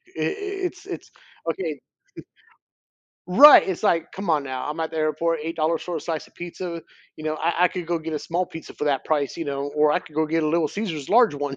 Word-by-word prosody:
it's 395 -2 -3
it's - - -8 0.4
okay 160 -6 -4 1.5
Right. 275 +10 +9
It's, 190 +2 -3
like, 165 -5 +1
come 195 -2 -6
on 150 -3 +2
now. 130 0 -4
I'm 155 +2 -5
at 160 - -2
the 160 - -5
airport, 155 +1 0
$8 165 0 -1
for 175 -2 -4
a - - -4
slice 160 -1 -4
of - - -25
pizza, 175 -1 -6 0.3
you 155 - -10
know? 155 0 -1
I 170 +3 +2
I - - +6
could 180 -1 -5
go 170 -1 -1
get 160 0 -5
a 150 - -2
small 175 +2 -1
pizza 160 - -10
for 150 - -4
that 140 -2 0
price, 145 -1 0
you 165 - -3
know, 140 0 -3
or 150 0 +4
I 180 - +2
could 155 -4 -17
go 155 0 +2
get 160 +1 0
a - - +1
little 160 -1 +2
Caesar's 165 -9 -4
large 230 -4 +5
one, 145 -1 -3
165 Hz, 230 wpm, -24 LUFS, 150-180 Hz, 1.5 s, Right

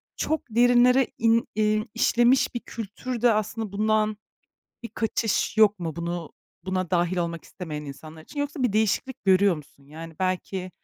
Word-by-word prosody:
çok 315 -1 -1
derinlere 245 +2 +4
in 230 0 +2
iii, 215 +1 +1
işlemiş 240 +2 +3
bir - - -1
kültür 230 +2 -6
de 240 -2 +5
aslında 215 0 -2
bundan 215 +1 +1 0.7
bir 235 - -6
kaçış 225 -2 -1
yok 210 -2 +5
mu, 165 -3 -5
bunu 170 -1 -4 0.3
buna 185 -2 -2
dahil 175 0 +1
olmak 170 -2 -3
istemeyen 155 -5 -7
insanlar 155 +3 -10
için? 290 - -7
Yoksa 285 -1 -3
bir 245 -5 +1
değişiklik 220 +5 0
görüyor 190 -1 +4
musun? 140 -2 -15
Yani, 160 +2 -10
belki 185 0 -2
210 Hz, 155 wpm, -25 LUFS, 175-235 Hz, 0.7 s, de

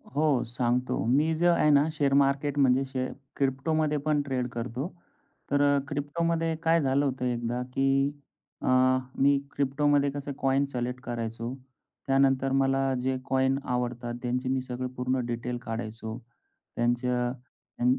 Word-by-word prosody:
हो, 150 -4 +2
सांगतो. 120 -2 -1
मी 150 +7 +3
जे 175 +1 +3
आहे 170 -3 +4
ना 145 +2 +5
शेअर 140 -3 +1
मार्केट 140 +1 +2
म्हणजे 135 0 +4
शे 130 -1 -3 0.3
क्रिप्टोमध्ये 150 +3 0
पण 150 -1 +2
ट्रेड 130 -3 -2
करतो. 120 +5 -4 0.6
तर 145 0 +3
अ, 145 0 +4
क्रिप्टोमध्ये 165 +3 -1
काय 165 +1 +4
झालं 140 +1 +2
होतं 130 -1 -2
एकदा, 120 0 -1
की 135 +1 +2 0.5
अ, - - -3 0.5
मी 140 0 +5
क्रिप्टोमध्ये 140 +1 +2
कसं 145 0 -5
कॉइन 135 +1 +2
सिलेक्ट 125 -1 -3
करायचो. 115 +1 -4 0.5
त्यानंतर 135 0 +3
मला 135 0 +2
जे 130 0 0
कॉइन 130 +1 +2
आवडतात, 120 -1 -2
त्यांची 125 +1 -1
मी 130 0 +1
सगळे 125 0 -4
पूर्ण 130 +1 0
डिटेल 120 +1 -3
काढायचो. 110 0 -5 0.6
त्यांचं 120 +1 0 0.5
त्या 120 - 0
135 Hz, 140 wpm, -28 LUFS, 125-140 Hz, 0.6 s, ना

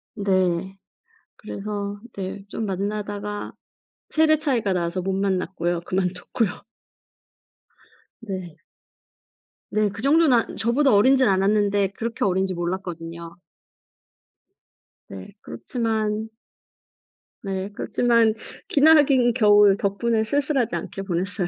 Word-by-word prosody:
네. 190 -2 0 0.6
그래서 205 -1 -5 0.2
네, 195 0 -5
좀 220 +2 -4
만나다가 205 +1 -4 0.6
세대 310 0 +3
차이가 250 -10 0
나서 180 0 -1
못 190 +1 -2
만났고요. 185 -3 -1
그만뒀고요. 185 +3 -2 1.6
네. 185 -7 -7 1.1
네. 215 -1 +1
그 205 +3 -8
정도는 305 +3 +4
안 230 - 0
저보다 255 +3 +2
어리진 260 +6 +5
않았는데 200 0 +2
그렇게 230 0 -3
어린지 190 -1 +1
몰랐거든요. 170 -1 -5 1.7
네. 95 - -10
그렇지만 220 -2 -3 1.1
네, 195 -1 -3
그렇지만 230 0 +2 0.3
기나긴 280 -5 +5
겨울 205 -4 +5
덕분에 220 +3 0
쓸쓸하지 270 - 0
않게 180 +3 -5
보냈어요. 190 +1 -2
205 Hz, 230 characters per minute, -23 LUFS, 190-230 Hz, 1.7 s, 어리진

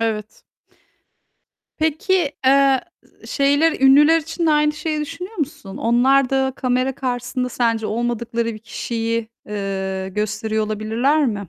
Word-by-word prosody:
Evet. 215 -2 -3 1.4
Peki, 320 0 +1
eee, 270 -1 +5 0.5
şeyler, 285 +2 +2
ünlüler 295 +4 +6
için 325 +2 -3
de - - +4
aynı 300 0 +3
şeyi 305 0 -3
düşünüyor 340 +8 -6
musun? 270 - -5
Onlar 255 +3 +3
da 265 0 +1
kamera 255 +1 0
karşısında 250 -1 -3
sence 230 -2 0
olmadıkları 235 +1 -2
bir 215 - -9
kişiyi, 230 0 -3 0.2
eee, 190 -2 -3
gösteriyor 215 +2 -2
olabilirler 230 +8 +1
mi 205 -5 -3
250 Hz, 120 wpm, -20 LUFS, 220-295 Hz, 1.4 s, ünlüler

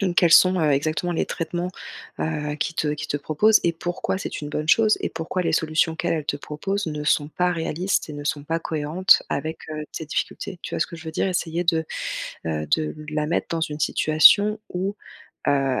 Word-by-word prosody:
Donc, 185 -3 0
quels 175 -1 +4
sont, 185 0 +7
heu, 155 - +3
exactement 155 +5 0
les - - 0
traitements, 175 +2 -3 0.5
heu, 150 -2 -2
qu'ils 165 +2 -3
te 155 - 0
qu'ils 150 0 -3
te 145 - 0
proposent 160 +9 +3
et 170 - +3
pourquoi, 175 +3 -3
c'est - - -5
une 145 - -5
bonne 150 +1 -3
chose 215 +2 +5
et - - -1
pourquoi 165 +3 -3
les - - 0
solutions 160 0 +1
qu'elle 175 - -1
elle 155 -3 -3
te 145 - -1
propose 195 +7 -3
ne 150 -1 -3
sont 150 -1 +2
pas 180 +3 0
réalistes 165 +3 -1
et 150 - -6
ne 145 0 -6
sont 145 -1 -2
pas 165 +2 -1
cohérentes 160 +5 +3
avec, 160 +3 -3
heu, 155 -1 -4
tes 160 - -5
difficultés? 185 +4 -3
Tu - - -5
vois - - -3
ce - - +2
que - - -10
je 160 - -12
veux 160 - -4
dire? 160 - 0
Essayer 175 -1 -1
de, 165 -1 +2 0.6
heu, 75 -1 -2
de 155 - 0 0.2
la 150 -1 -1
mettre 170 - 0
dans 165 -1 -1
une 150 -1 -2
situation 200 +10 +5
où, 190 +3 -2 0.5
heu, 135 -2 +2
160 Hz, 220 wpm, -23 LUFS, 150-175 Hz, 0.6 s, sont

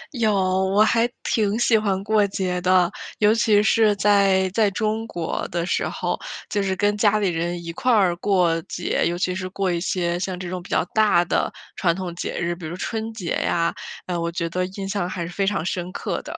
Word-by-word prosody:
有， 220 -3 +2
我 190 +1 +2
还 230 +2 +2
挺 215 -1 +1
喜 240 -1 +3
欢 200 -3 +1
过 215 -1 +3
节 185 -2 -2
的， 180 -1 +3 0.3
尤 210 0 +4
其 215 -2 +3
是 215 0 +4
在， 195 -2 +3
在 210 +1 +3
中 220 +2 -2
国 170 -6 -3
的 170 -1 -2
时 - - 0
候， - - -3 0.3
就 205 - +1
是 190 -1 -1
跟 205 +1 +1
家 210 0 +3
里 200 -3 +1
人 170 +1 -2
一 170 - -5
块 250 +7 0
儿 190 -6 +4
过 175 -4 +2
节， 175 - -1
尤 175 - -2
其 180 0 0
是 185 0 -4
过 190 0 -1
一 170 -1 -1
些 175 -1 -1
像 185 -1 -3
这 185 - -5
种 180 0 -4
比 - - -14
较 - - +1
大 210 -5 +4
的 - - 0 0.2
传 170 -3 +1
统 185 -2 -5
节 170 - -4
日， 175 0 -1
比 170 -2 -8
如 170 - -5
春 225 +2 -3
节 190 -7 -5
呀， 170 0 +1 0.3
哎， 180 - -3
我 170 0 -2
觉 170 0 -2
得 185 +1 -1
印 195 +1 -6
象 195 -3 -2
还 170 -2 -4
是 175 - -8
非 195 +1 0
常 195 -5 0
深 180 0 -3
刻 - - -3
的。 - - -8
190 Hz, 240 characters per minute, -23 LUFS, 175-210 Hz, 0.3 s, 尤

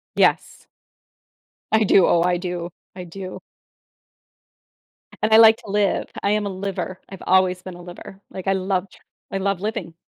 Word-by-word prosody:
Yes. - - +1 1.0
I 220 0 +4
do. 195 -2 +5
Oh, 170 - +3
I 175 0 +2
do, 175 -1 -4 0.3
I 180 - -7
do. 185 +2 -8 1.8
And 215 +1 +2
I 220 - +9
like 225 0 +8
to - - -14
live. 205 -1 +1 0.2
I 200 - +2
am 210 0 +1
a 200 - -2
liver, 190 -1 -5
I've 195 - -10
always 185 -1 +3
been 185 -1 -9
a 175 - -11
liver. 180 +2 -11
Like, 190 0 -8
I 195 - +3
loved 190 0 -2 0.3
I 195 - -2
love 195 -1 -1
living. 210 -6 -4
190 Hz, 165 wpm, -22 LUFS, 180-200 Hz, 1.8 s, I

